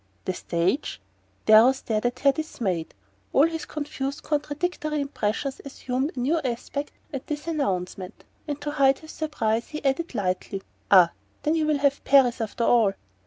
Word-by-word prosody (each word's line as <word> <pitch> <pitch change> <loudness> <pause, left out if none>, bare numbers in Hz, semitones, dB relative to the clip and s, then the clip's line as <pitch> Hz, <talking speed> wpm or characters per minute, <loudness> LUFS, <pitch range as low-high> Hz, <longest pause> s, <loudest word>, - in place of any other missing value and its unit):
"The 185 - 0
stage?" 175 - -1 0.5
Darrow 220 +4 +8
stared 225 -3 -1
at 245 - -5
her, 280 - +6
dismayed. 210 - -3 0.4
All 280 - +6
his 325 -1 -3
confused 285 -2 -4
contradictory 300 +1 -1
impressions 275 -1 -2
assumed 265 +2 -3
a - - -4
new 295 +7 +2
aspect 275 +2 -3 0.2
at 270 -1 -5
this 295 0 -4
announcement; 190 - -3 0.2
and 290 -1 -3
to 295 0 -3
hide 275 -2 +4
his 315 - -12
surprise 230 -8 -1
he 305 -2 -7
added 275 +2 0
lightly: 195 -1 -2 0.3
"Ah 180 -4 +7 0.3
then 305 - +2
you 315 -2 +1
will 305 -1 +2
have 280 0 +1
Paris, 260 -3 +4
after 225 +1 -2
all!" 225 -5 +4
270 Hz, 160 wpm, -25 LUFS, 220-300 Hz, 0.5 s, Darrow